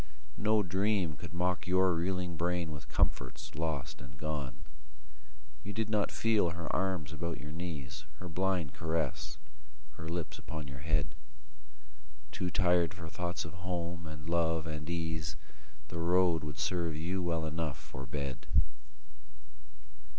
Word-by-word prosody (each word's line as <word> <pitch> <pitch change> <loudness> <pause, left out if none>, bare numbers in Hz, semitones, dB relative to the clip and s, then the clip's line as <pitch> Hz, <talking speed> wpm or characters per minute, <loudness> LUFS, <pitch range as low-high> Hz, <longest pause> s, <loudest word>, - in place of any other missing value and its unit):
No 110 0 +5
dream 95 -2 +2
could 80 +2 -7
mock 90 +1 +1
Your 95 0 +5
reeling 90 +1 0
brain 85 -1 +1
with 75 -3 -7
comforts 65 -1 +1
lost 80 -5 -2
and 70 +1 -10
gone. 70 -2 -3 1.0
You 100 - -5
did 110 0 0
not 105 -2 +3
feel 110 -6 +4
her 85 -1 -2
arms 90 -6 +1
about 85 +2 -2
your 75 0 -6
knees, 80 -5 -4
Her 90 - -6
blind 90 -3 +1
caress, 80 -4 -1 0.6
her 80 0 -5
lips 85 -1 -2
upon 80 -2 -5
your 70 -1 -7
head: 75 -2 +2 1.2
Too 90 - -1
tired 90 -1 +4
for 85 -3 -6
thoughts 85 0 -2
of 80 - -7
home 85 -1 -2
and 75 -1 -7
love 80 -1 +3
and 75 0 -4
ease, 80 -1 -1 0.5
The 85 - -3
road 85 -1 +4
would 75 0 -4
serve 85 0 +1
you 90 +4 0
well 85 -2 +1
enough 80 -2 -1
for 65 0 -8
bed. 70 -2 -3
85 Hz, 145 wpm, -34 LUFS, 75-90 Hz, 1.2 s, No